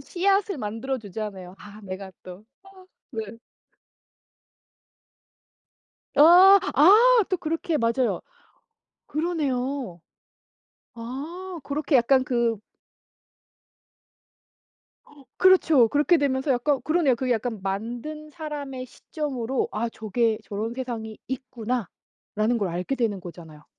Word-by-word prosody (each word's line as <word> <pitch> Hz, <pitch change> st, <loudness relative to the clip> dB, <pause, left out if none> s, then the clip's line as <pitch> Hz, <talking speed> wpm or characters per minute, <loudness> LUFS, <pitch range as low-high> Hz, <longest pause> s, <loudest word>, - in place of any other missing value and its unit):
씨앗을 390 Hz, +4 st, 0 dB
만들어 225 Hz, +5 st, -3 dB
주잖아요. 200 Hz, -4 st, -7 dB
아 210 Hz, +1 st, -13 dB
내가 190 Hz, 0 st, -7 dB
또 185 Hz, +3 st, -11 dB, 0.7 s
아 -, -, -11 dB
네. 230 Hz, -, -10 dB, 2.8 s
아 360 Hz, +7 st, +8 dB, 0.2 s
아 435 Hz, -, +6 dB
또 370 Hz, -, 0 dB
그렇게 330 Hz, -1 st, -2 dB
맞아요. 235 Hz, +2 st, 0 dB, 0.9 s
그러네요. 275 Hz, -, -2 dB, 1.0 s
아 310 Hz, +11 st, -7 dB
그렇게 290 Hz, +1 st, +1 dB
약간 260 Hz, +2 st, +3 dB
그 235 Hz, -3 st, 0 dB, 2.8 s
그렇죠. 325 Hz, -10 st, +5 dB
그렇게 295 Hz, +7 st, +3 dB
되면서 275 Hz, -1 st, 0 dB
약간 265 Hz, +3 st, +1 dB
그러네요. 310 Hz, -5 st, +2 dB
그게 255 Hz, +1 st, 0 dB
약간 225 Hz, -2 st, -3 dB
만든 240 Hz, +10 st, -5 dB
사람의 290 Hz, -5 st, -6 dB
시점으로 265 Hz, -3 st, -4 dB
'아 225 Hz, +3 st, -2 dB
저게 225 Hz, 0 st, -1 dB
저런 215 Hz, +3 st, -4 dB
세상이 235 Hz, -4 st, -6 dB
있구나.'라는 240 Hz, -2 st, -4 dB
걸 200 Hz, -3 st, -1 dB
알게 180 Hz, +9 st, -3 dB
되는 225 Hz, -6 st, -1 dB
거잖아요. 165 Hz, -4 st, -12 dB
255 Hz, 215 characters per minute, -25 LUFS, 220-305 Hz, 2.8 s, 아